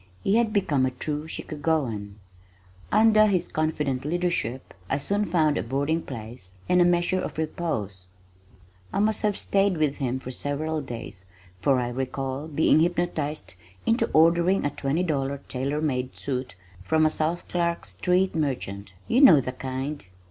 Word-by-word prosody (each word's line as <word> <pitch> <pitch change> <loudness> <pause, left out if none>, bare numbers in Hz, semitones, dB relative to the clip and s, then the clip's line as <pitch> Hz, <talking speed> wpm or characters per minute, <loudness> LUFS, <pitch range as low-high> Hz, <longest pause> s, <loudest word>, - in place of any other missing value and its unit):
He 200 +3 +3
had 235 -2 +2
become 160 - +1
a 130 - +3
true 150 +4 -4
Chicagoan. 145 -11 -2 0.8
Under 215 0 +6
his 180 -4 +1
confident 150 -4 -1
leadership 165 -6 -2 0.2
I 135 - +1
soon 200 +8 0
found 160 -4 +2
a - - 0
boarding 140 +6 -1
place 110 - -9
and 180 0 +4
a - - +6
measure 175 +1 +2
of - - -5
repose. 110 - -3 0.9
I - - -3
must 215 +2 +2
have 210 -2 +1
stayed 195 -2 +2
with 150 -2 +1
him 130 -2 -1
for 130 -1 -7
several 150 +4 -2
days 115 -7 -8 0.3
for 135 +6 +3
I 120 -1 -1
recall 130 +3 -3
being 155 0 +3
hypnotized 165 -3 -1 0.3
into 230 +3 +2
ordering 170 +3 +4
a 145 - +1
twenty 150 +6 -1
dollar 140 -4 -1
tailor 140 +4 -2
made 130 -4 -2
suit 130 -5 -4 0.3
from 155 +11 +2
a 155 - +3
South 160 +3 -2
Clark 170 -1 -1
street 180 - +1
merchant 105 - -3
you 250 - +3
know 180 - +9
the 130 -1 -3
kind. 130 +3 -5
150 Hz, 155 wpm, -26 LUFS, 130-175 Hz, 0.9 s, know